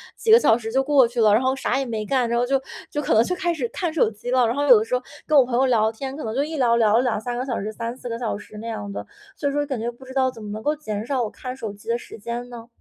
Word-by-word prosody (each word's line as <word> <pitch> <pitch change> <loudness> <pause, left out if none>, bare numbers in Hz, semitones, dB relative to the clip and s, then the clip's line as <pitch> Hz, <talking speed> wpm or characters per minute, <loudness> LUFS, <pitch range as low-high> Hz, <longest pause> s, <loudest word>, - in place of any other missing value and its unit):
几 440 - 0
个 455 - +9
小 225 - +4
时 225 -2 -6
就 265 +3 +2
过 275 -3 +5
去 240 0 -2
了， 215 -2 +5
然 220 - +4
后 260 0 +1
啥 265 -1 -1
也 270 - -1
没 220 -3 -3
干， 255 +1 +1
然 235 - +1
后 245 - +2
就 270 +1 +1 0.3
就 295 - -2
可 280 - 0
能 220 - +6
就 360 - -2
开 350 -2 0
始 265 -7 -2
看 345 -4 -3
手 280 -9 +3
机 225 +3 -6
了。 255 -1 +4
然 230 - -1
后 285 +1 0
有 245 -5 +8
的 215 - -2
时 240 - -1
候 250 - -1 0.3
跟 305 -1 +4
我 265 - +7
朋 245 -1 -2
友 265 +2 +4
聊 220 -3 +3
天， 265 +4 -6
可 310 - -6
能 220 - -3
就 275 - +2
一 315 +1 -4
聊 240 -4 +3
聊 220 -1 +4
了 245 - +3
2-3 240 0 -2
个 255 - -2
小 245 -4 -2
时， 210 +2 -4
3-4 235 +3 -6
个 230 - -3
小 225 -4 -2
时 210 - -12
那 225 +2 -7
样 210 -3 -5
的， - - -6 0.3
所 285 - -2
以 - - -3
说 290 - +1
感 265 -5 -3
觉 230 +2 -2
不 240 +2 -16
知 260 - -10
道 260 -1 +2
怎 225 -3 -11
么 210 - -7
能 215 +1 -5
够 300 +1 +1
减 215 -8 -5
少 255 -1 0
我 220 - -2
看 255 +3 -7
手 225 -5 -5
机 205 +2 -17
的 235 - +2
时 240 - -11
间 235 +3 -5
呢？ 235 -1 -10
245 Hz, 360 characters per minute, -23 LUFS, 225-270 Hz, 0.3 s, 个